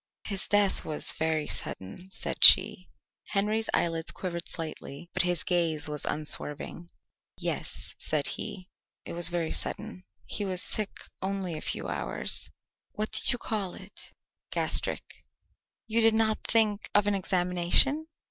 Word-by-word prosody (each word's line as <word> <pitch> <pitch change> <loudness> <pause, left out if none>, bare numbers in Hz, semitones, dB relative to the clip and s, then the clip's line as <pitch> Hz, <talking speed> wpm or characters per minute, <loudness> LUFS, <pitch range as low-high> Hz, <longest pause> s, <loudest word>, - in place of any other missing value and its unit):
"His 195 -3 -1
death 205 -1 +2
was 155 -1 +2
very 160 -1 -1
sudden," 125 - -5
said - - -4
she. - - +8 0.4
Henry's 215 +2 -1
eyelids 165 -1 -1
quivered 170 -2 -4
slightly 160 -1 -7
but - - +2
his 175 -2 +1
gaze 165 -4 +1
was 150 -1 -2
unswerving. 150 +2 -3 0.5
"Yes," - - -5
said - - -1
he; 200 -4 -3 0.4
"it - - -7
was 170 0 +4
very 170 -2 -2
sudden. 215 -4 -2 0.2
He 210 - -3
was 185 -2 -2
sick 210 -2 -1 0.3
only 190 -3 -3
a 155 - -6
few - - -3
hours." - - -2 0.4
"What 215 +1 -4
did - - +3
you 245 - 0
call 210 -6 -4
it?" 195 +1 -11 0.4
"Gastric." - - +2 0.8
"You 230 0 +1
did 225 0 +4
not 220 -1 +1
think 215 -2 +2
of 205 0 +5
an 205 - +1
examination?" 185 - +2
185 Hz, 140 wpm, -28 LUFS, 170-210 Hz, 0.8 s, she